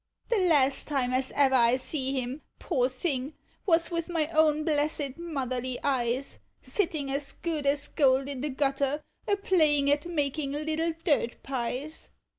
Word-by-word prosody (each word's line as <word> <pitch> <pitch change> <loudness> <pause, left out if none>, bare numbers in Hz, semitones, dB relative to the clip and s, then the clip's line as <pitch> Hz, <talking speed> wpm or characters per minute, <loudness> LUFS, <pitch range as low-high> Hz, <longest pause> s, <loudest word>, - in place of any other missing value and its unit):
The 465 -3 +2
last 280 -5 +3
time 260 -4 0
as 260 +1 0
ever 275 -2 +4
I 240 -1 +5
see 265 0 -2
him, 255 +4 -5 0.2
poor 255 -7 0
thing, 270 +1 -3 0.3
was 335 -1 +3
with 335 0 -2
my 330 -3 +1
own 310 -2 +3
blessed 295 -3 0
Motherly 255 -6 -3
eyes, 260 -1 -1 0.2
Sitting 310 -8 -1
as 280 0 -2
good 310 -4 -3
as 285 +1 +1
gold 270 -2 +3
in 275 -3 -5
the 295 - -1
gutter, 275 +1 0 0.2
a 410 - +3
playing 305 -8 +3
at 290 +3 +1
making 290 -3 -1
little 315 +2 -1
dirt 285 -8 0
pies. 270 +3 -4
285 Hz, 155 wpm, -28 LUFS, 265-310 Hz, 0.3 s, I